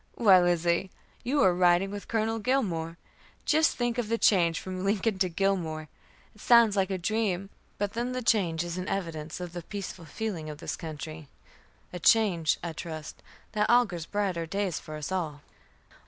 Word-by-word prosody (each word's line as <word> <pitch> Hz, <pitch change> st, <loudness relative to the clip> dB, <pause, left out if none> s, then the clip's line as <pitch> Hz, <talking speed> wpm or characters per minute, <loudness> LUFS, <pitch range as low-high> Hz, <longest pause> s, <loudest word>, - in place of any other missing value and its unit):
"Why, 195 Hz, -5 st, +6 dB
Lizzie, 175 Hz, +1 st, +1 dB, 0.3 s
you 280 Hz, +4 st, +2 dB
are 185 Hz, -, +5 dB
riding 180 Hz, +2 st, +3 dB
with 205 Hz, 0 st, -7 dB
Colonel 225 Hz, 0 st, 0 dB
Gilmore. 180 Hz, -10 st, -1 dB, 0.5 s
Just 315 Hz, +1 st, +3 dB
think 240 Hz, 0 st, 0 dB
of 225 Hz, -3 st, -2 dB
the 230 Hz, -, +1 dB
change 170 Hz, -7 st, +3 dB
from 185 Hz, 0 st, -5 dB
Lincoln 200 Hz, 0 st, 0 dB
to 185 Hz, -1 st, +2 dB
Gilmore! 165 Hz, -4 st, -1 dB, 0.4 s
It 210 Hz, -, -17 dB
sounds 235 Hz, -3 st, +6 dB
like 195 Hz, -1 st, +1 dB
a 190 Hz, -, -1 dB
dream. 195 Hz, 0 st, -1 dB, 0.3 s
But 205 Hz, 0 st, -2 dB
then 240 Hz, +2 st, -2 dB
the 255 Hz, 0 st, -3 dB
change 175 Hz, -8 st, +2 dB
is 175 Hz, +1 st, -4 dB
an 180 Hz, -, -5 dB
evidence 165 Hz, -4 st, -4 dB
of 175 Hz, -1 st, -6 dB
the 175 Hz, -, -5 dB
peaceful 190 Hz, -1 st, -7 dB
feeling 165 Hz, -1 st, -4 dB
of 150 Hz, -, -7 dB
this 165 Hz, -, -4 dB
country; 155 Hz, -1 st, -7 dB, 0.7 s
a 180 Hz, -, -5 dB
change, 175 Hz, -5 st, +3 dB
I 170 Hz, -2 st, -3 dB
trust, 155 Hz, -1 st, -7 dB, 0.3 s
that 210 Hz, -1 st, 0 dB
augurs 205 Hz, -9 st, +3 dB
brighter 190 Hz, -5 st, -1 dB
days 195 Hz, -1 st, -1 dB
for 155 Hz, -, -9 dB
us 150 Hz, +3 st, -5 dB
all." 160 Hz, -6 st, -2 dB
185 Hz, 175 wpm, -28 LUFS, 165-215 Hz, 0.7 s, Why